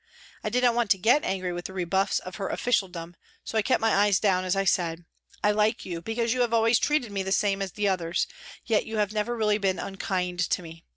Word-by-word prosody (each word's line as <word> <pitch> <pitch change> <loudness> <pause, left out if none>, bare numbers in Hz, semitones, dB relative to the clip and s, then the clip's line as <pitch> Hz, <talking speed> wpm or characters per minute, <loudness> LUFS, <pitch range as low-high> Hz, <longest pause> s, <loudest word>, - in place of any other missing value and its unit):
I - - -1
did 250 +1 0
not 245 -1 +5
want 235 -2 0
to 195 - +4
get 235 +10 +3
angry 185 -2 -2
with 175 0 -6
the 190 - -6
rebuffs 190 +1 0
of 185 - -6
her 195 - -3
officialdom, 180 -8 -1 0.3
so - - -7
I 220 - +4
kept 255 - +2
my 225 -1 +2
eyes 200 -1 +4
down 185 -3 +2
as 185 +1 +1
I 195 0 0
said: 170 -2 0 0.2
" - - -28
I 210 - +4
like 210 +1 +1
you 170 -2 -5
because 225 +4 -1
you 255 - 0
have 235 -1 +2
always 230 +1 +4
treated 295 -7 0
me 200 -1 -2
the 190 0 -4
same 200 0 +1
as 195 -2 -3
the 210 -1 0
others, 175 -2 0 0.4
yet 220 -3 +1
you 220 0 -4
have 210 -1 0
never 220 +3 -1
really 210 -1 +2
been 195 -2 0
unkind 185 -2 -3
to 180 0 0
me. 165 0 -12
195 Hz, 250 wpm, -26 LUFS, 185-225 Hz, 0.4 s, not